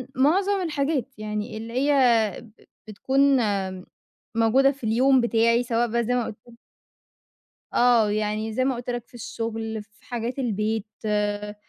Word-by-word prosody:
معظم 380 +9 +2
الحاجات 290 -5 -1
يعني 215 +1 -4
اللي 225 +1 -7
هي 275 +3 +1 0.5
ب 230 -3 -16 0.4
بتكون 260 +6 -2 1.2
موجودة 255 +5 +4
في 275 -3 -15
اليوم 255 +4 +3
بتاعي، 230 0 +2
سواء 240 0 0
بقى 235 +1 0
زي 245 - -1
ما 245 - 0
قُلت 230 +2 -11 1.2
آه. 240 -3 +4
يعني 215 +1 -2
زي 255 +2 0
ما 265 - +1
قُلت 240 +1 -7
لك 240 -1 -4
في - - -30
الشغل، 225 -2 -5
في 210 +1 -29
حاجات 240 +2 -4
البيت، 220 -2 -1 0.2
آآ 210 0 -1
230 Hz, 145 wpm, -24 LUFS, 215-255 Hz, 1.2 s, موجودة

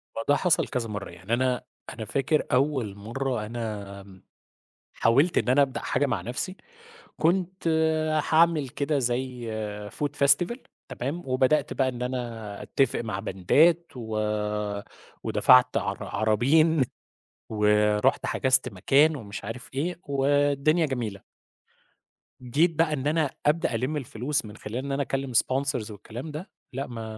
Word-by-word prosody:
ما 115 - -3
ده 145 - +6
حصل 170 +2 +2
كذا 115 -3 -3
مرة. 105 -1 -5
يعني 95 +5 -6
أنا 125 0 +1 0.3
أنا 110 - -6
فاكر 135 +7 +1
أول 130 -6 +1
مرّة 115 +2 -3
أنا 100 -4 -7 0.7
حاولت 140 +9 +3
إن - - +2
أنا 130 +3 +5
أبدأ 135 -2 0
حاجة 135 +3 0
مع 130 - -1
نَفْسي، 130 +10 -4 0.6
كنت 180 +2 0 0.6
هاعمل 160 -3 +4
كده 145 +2 -1
زي 125 -1 -2 0.4
Food 145 +7 -2 0.2
Festival 175 - +3 0.3
تمام، 140 +8 -4
وبدأت 130 +3 +2
بقى 130 -1 +1
إن 125 -1 -7
أنا 120 -5 -4
أتّفق 135 - 0
مع 110 -5 -4
باندات 160 - +3
و 110 -3 -4 1.1
ودفَعت 125 0 +5
عر 100 0 -3
عرابين 135 +9 +3 0.7
ورُحت 105 +2 +2
حجزت 130 -1 +2
مكان، 135 +10 +3
ومش 105 -6 -7
عارف 115 +4 -7
إيه 165 +6 -2
والدنيا 145 +3 +2
جميلة. 115 -8 -4 1.2
جيت 145 +8 +2
بقى 160 0 +2
إن 140 -1 -2
أنا 155 -1 +1 0.2
أبدأ 160 +3 +2
ألِم 140 +5 -1
الفلوس 130 0 -2
من 105 0 -10
خلال 105 +3 -6
إن 140 - -4
أنا 135 +1 0
أكلِّم 135 -1 -2
sponsors 130 -2 +1
والكلام 115 +8 -8
ده، 155 +6 -7 0.2
لأ، 135 +2 -3
ما 115 -2 -6
130 Hz, 135 wpm, -26 LUFS, 115-145 Hz, 1.2 s, ده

